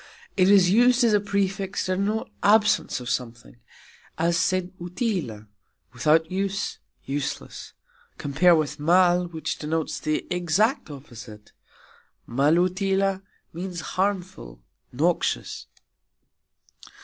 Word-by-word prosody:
It 185 -1 +4
is 190 -3 +5
used 245 +4 +4
as 230 -2 +4
a 210 - +4
prefix 195 -1 -2
to 185 - 0
denote 210 +3 -2
absence 210 -6 +3
of 125 - -9
something, 120 -1 -5 0.6
as 170 +1 +1
"sen 185 0 0
utila", 175 - -3 0.5
without 155 +6 +2
use, 195 +2 -2 0.3
useless 140 +1 -5 0.4
(compare 170 +5 +3
with 155 -3 -2
"mal", 175 +3 +3
which 160 -2 -5
denotes 160 +1 -2
the 155 0 -2
exact 180 - +1
opposite; 120 -6 -11 0.8
"malutila" 185 - +1 0.3
means 175 0 -5
"harmful, 185 - -3 0.3
noxious"). 165 +7 -1
180 Hz, 100 wpm, -24 LUFS, 150-195 Hz, 0.8 s, is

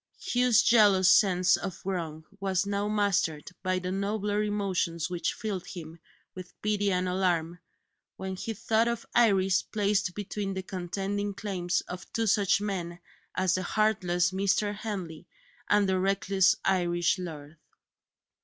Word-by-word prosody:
Hugh's 245 -2 +3
jealous 205 -5 +5
sense 185 -3 +4
of 185 - -5
wrong 165 -5 -4
was 195 -1 0
now 200 0 -1
mastered 200 -7 0
by 185 0 0
the 185 0 -3
nobler 205 +1 -1
emotions 190 -5 -1
which 175 -1 -2
filled 205 -6 -4
him 165 -2 -9 0.3
with 185 -1 -11
pity 205 -1 +1
and 180 0 0
alarm, 175 -2 0 0.6
when 190 0 -4
he 225 +4 -5
thought 225 +2 +1
of 235 -1 -2
Iris 195 -5 +4
placed 200 -3 -1
between 205 -1 -4
the 190 - -4
contending 195 +2 -3
claims 185 -4 -1
of 180 0 -9
two 230 - 0
such 200 -2 +3
men 185 -4 -4 0.4
as 185 -1 +1
the 185 - 0
heartless 185 -3 +1
Mr. 200 +2 +1
Henley 195 -7 -6 0.4
and 205 -1 +4
the 190 -1 +1
reckless 195 +1 +2
Irish 175 -1 +1
lord. 155 -3 -8
190 Hz, 140 wpm, -28 LUFS, 180-205 Hz, 0.6 s, jealous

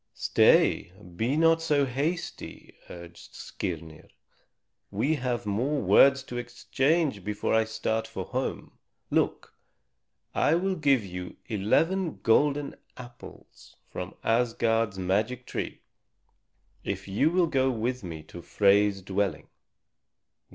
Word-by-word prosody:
"Stay, - - +3 0.2
be 120 - 0
not 165 0 +4
so 150 -4 +2
hasty," 145 +7 -4 0.2
urged 85 -1 -12
Skirnir. 80 -2 -6 0.8
"We 120 +10 0
have 125 -6 -2
more 125 +9 0
words 135 0 +5
to 125 -2 -7
exchange 130 - 0
before 105 +1 -2
I 110 0 +3
start 110 0 -2
for 95 -5 -6
home. 130 +1 -4 0.3
Look, - - 0 0.8
I 155 - +3
will 190 +3 0
give 140 - +2
you 90 -1 -7
eleven 160 - 0
golden 145 +5 +2 0.2
apples 120 -1 -13 0.2
from 90 0 -6
Asgard's 115 -2 +1
magic 105 +7 -1
tree - - -5 1.0
if - - -4
you 100 +10 +2
will 180 +1 +2
go 135 -5 +1
with 125 0 -2
me 80 -3 -7
to 85 - -11
Frey's 100 +1 +2
dwelling." 95 -3 -2
120 Hz, 115 wpm, -27 LUFS, 100-140 Hz, 1.0 s, words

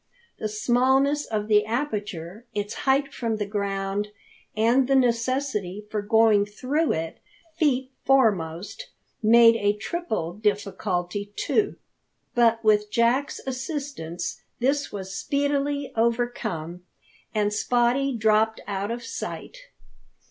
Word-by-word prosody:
The 215 - -2
smallness 260 +6 +2
of 210 -2 -2
the 210 -1 +4
aperture, 210 - -4
its 205 0 -2 0.2
height 275 +1 +2
from 230 -2 -2
the 210 -1 -2
ground, 200 0 -2 0.5
and 240 +4 +3
the 270 - +3
necessity 235 -5 0
for 210 - -1
going 220 -1 +4
through 275 +9 0
it 160 0 -4 0.4
feet 265 -5 +1
foremost, 210 - +1 0.3
made 230 +1 +7
a 205 -1 +1
triple 215 - -3
difficulty, 200 -1 -2
too. 410 -2 0 0.6
But 230 -1 +3
with 210 -1 +3
Jack's 235 +5 +1
assistance 255 - -4 0.2
this 280 +3 0
was 190 -1 -6
speedily 285 +2 -1
overcome, 225 -8 -1 0.5
and 210 -1 +2
Spottie 245 +4 +1
dropped 220 0 +2
out 200 0 -3
of 235 +1 -4
sight. 230 - -6
225 Hz, 110 wpm, -25 LUFS, 205-260 Hz, 0.6 s, made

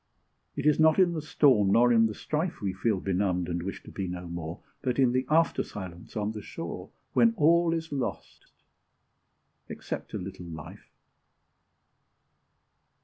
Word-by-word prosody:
It - - -4
is 150 0 +4
not 160 0 +5
in 180 -3 +4
the 160 - -3
storm 130 -10 +3
nor 120 +1 +5
in 115 -1 +5
the 110 - -6
strife 160 +3 -2
We 100 -2 -2
feel 100 +1 0
benumbed, 90 -2 0
and 85 0 -2
wish 95 +3 -6
to - - -11
be 95 -2 -4
no 90 0 -6
more, 85 -1 -6 0.2
But 125 -2 -1
in 130 -3 +4
the 130 +1 0
after 165 +2 +3
silence 95 -1 -8
on 105 0 -1
the 110 -1 -7
shore, - - -7 0.2
When 230 -1 +4
all 170 +2 +4
is 165 -1 -3
lost, 135 -3 -5 1.2
except - - -6
a - - 0
little 90 -1 -7
life. 80 -2 -10
110 Hz, 160 wpm, -28 LUFS, 90-150 Hz, 1.2 s, not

